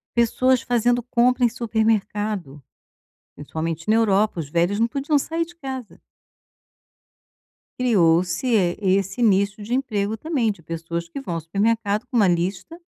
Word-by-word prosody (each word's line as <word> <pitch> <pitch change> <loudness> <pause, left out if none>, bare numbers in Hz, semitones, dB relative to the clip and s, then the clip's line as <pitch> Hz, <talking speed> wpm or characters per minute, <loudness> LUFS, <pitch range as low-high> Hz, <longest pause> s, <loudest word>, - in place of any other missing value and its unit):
Pessoas 250 +2 +3
fazendo 245 0 +1
compra 250 +1 +2
em 240 - +6
supermercado, 215 - -1 0.7
principalmente 160 +4 -5
na 220 - +5
Europa, 210 -3 +2
os 150 -4 -5
velhos 175 +6 +1
não 230 - +3
podiam 280 +4 0
sair 330 +4 -2
de 345 - -15
casa. 265 -6 -7 1.8
Criou-se, 180 -2 +2
esse 195 +3 +1
nicho 200 -1 +2
de 215 +4 -6
emprego 220 -5 -1
também, 250 -4 0
de 175 - -17
pessoas 170 +1 -5
que 220 - -7
vão 180 -11 -5
ao - - -3
supermercado 210 +5 0
com 245 - -4
uma 205 -4 +5
lista 180 - -2
215 Hz, 140 wpm, -22 LUFS, 180-245 Hz, 1.8 s, em